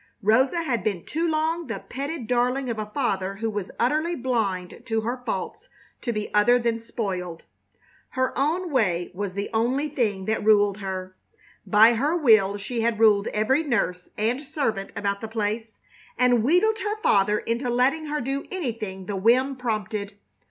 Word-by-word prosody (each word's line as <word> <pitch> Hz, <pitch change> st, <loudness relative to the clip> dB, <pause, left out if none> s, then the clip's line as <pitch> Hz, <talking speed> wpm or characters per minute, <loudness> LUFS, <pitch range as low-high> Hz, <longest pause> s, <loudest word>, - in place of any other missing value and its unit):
Rosa 260 Hz, -, +3 dB
had 245 Hz, -7 st, -1 dB
been 195 Hz, -5 st, -2 dB
too 330 Hz, +2 st, -1 dB
long 320 Hz, +1 st, 0 dB
the -, -, -3 dB
petted 280 Hz, 0 st, -5 dB
darling 250 Hz, +2 st, 0 dB
of 220 Hz, -, -4 dB
a 215 Hz, -, -3 dB
father 195 Hz, -8 st, -1 dB
who 225 Hz, +2 st, -2 dB
was 205 Hz, -3 st, -4 dB
utterly 310 Hz, +8 st, +1 dB
blind 215 Hz, -, -2 dB
to 225 Hz, -1 st, 0 dB
her 245 Hz, +3 st, -3 dB
faults -, -, -4 dB, 0.3 s
to 240 Hz, -, -2 dB
be 210 Hz, -2 st, -4 dB
other 225 Hz, +4 st, +5 dB
than 235 Hz, -1 st, 0 dB
spoiled. 185 Hz, -7 st, -5 dB, 0.6 s
Her 260 Hz, 0 st, -1 dB
own 330 Hz, +6 st, 0 dB
way 185 Hz, -10 st, +1 dB
was 195 Hz, 0 st, -4 dB
the 200 Hz, +1 st, -3 dB
one 255 Hz, +7 st, 0 dB
thing 210 Hz, -9 st, -1 dB
that 220 Hz, +1 st, -1 dB
ruled 205 Hz, -2 st, +4 dB
her. 185 Hz, -1 st, -5 dB, 0.5 s
By 220 Hz, +2 st, +6 dB
her 285 Hz, +8 st, +1 dB
will 215 Hz, -, +4 dB
she 225 Hz, +4 st, -3 dB
had 230 Hz, -1 st, 0 dB
ruled 210 Hz, -2 st, +5 dB
every 220 Hz, +8 st, +1 dB
nurse 205 Hz, -, -1 dB
and 230 Hz, +5 st, 0 dB
servant 270 Hz, -9 st, -2 dB
about 200 Hz, -1 st, -2 dB
the 225 Hz, -, -4 dB
place, 220 Hz, 0 st, -3 dB, 0.4 s
and 245 Hz, -3 st, +3 dB
wheedled 380 Hz, -, +3 dB
her 420 Hz, +2 st, -2 dB
father 210 Hz, +1 st, +3 dB
into 235 Hz, +4 st, -2 dB
letting 265 Hz, +6 st, +1 dB
her 300 Hz, 0 st, -2 dB
do 275 Hz, +3 st, -3 dB
anything 225 Hz, -, -4 dB
the 205 Hz, -, -4 dB
whim 250 Hz, +7 st, +3 dB
prompted. 215 Hz, -4 st, -3 dB
230 Hz, 170 wpm, -25 LUFS, 205-270 Hz, 0.6 s, By